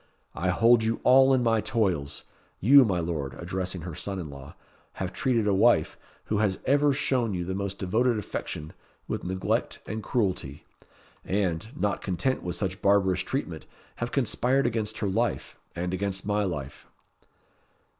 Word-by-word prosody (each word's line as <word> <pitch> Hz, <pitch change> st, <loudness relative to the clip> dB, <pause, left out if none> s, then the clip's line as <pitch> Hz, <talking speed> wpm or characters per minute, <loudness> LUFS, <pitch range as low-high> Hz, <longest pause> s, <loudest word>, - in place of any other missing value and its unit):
"I 90 Hz, -, -1 dB
hold 115 Hz, +5 st, +4 dB
you 110 Hz, +1 st, 0 dB
all 130 Hz, +1 st, +6 dB
in 130 Hz, -2 st, +3 dB
my 115 Hz, -2 st, +2 dB
toils. 90 Hz, -13 st, -1 dB, 0.4 s
You, 135 Hz, +7 st, +7 dB
my 95 Hz, -7 st, 0 dB
Lord," 75 Hz, -6 st, -3 dB
addressing 90 Hz, +1 st, -4 dB
her 85 Hz, 0 st, -6 dB
son 100 Hz, +5 st, -5 dB
in 80 Hz, -6 st, -6 dB
law, 70 Hz, -1 st, -11 dB, 0.4 s
"have 95 Hz, 0 st, -4 dB
treated 120 Hz, -5 st, +1 dB
a 105 Hz, -, +2 dB
wife, 95 Hz, -, +3 dB, 0.3 s
who 105 Hz, -, -1 dB
has 100 Hz, -3 st, +1 dB
ever 145 Hz, +2 st, +4 dB
shown 125 Hz, -6 st, 0 dB
you 90 Hz, -1 st, -3 dB
the 95 Hz, -, -3 dB
most 100 Hz, 0 st, -3 dB
devoted 115 Hz, +5 st, +1 dB
affection, 80 Hz, -6 st, -5 dB, 0.3 s
with -, -, -3 dB
neglect 95 Hz, +1 st, -1 dB
and 110 Hz, 0 st, -4 dB
cruelty, 95 Hz, -, -2 dB, 0.6 s
and, 95 Hz, -1 st, -1 dB
not 105 Hz, -1 st, 0 dB
content 95 Hz, +8 st, -1 dB
with 90 Hz, -, -4 dB
such 95 Hz, -2 st, -3 dB
barbarous 100 Hz, -3 st, +3 dB
treatment, -, -, -4 dB, 0.3 s
have 120 Hz, 0 st, -3 dB
conspired 135 Hz, +1 st, +1 dB
against 110 Hz, -2 st, -1 dB
her 105 Hz, -, -1 dB
life, 95 Hz, -, -1 dB, 0.2 s
and 90 Hz, +1 st, -3 dB
against 95 Hz, 0 st, -2 dB
my 105 Hz, 0 st, +1 dB
life." 70 Hz, -6 st, -6 dB
100 Hz, 160 wpm, -27 LUFS, 90-115 Hz, 0.6 s, You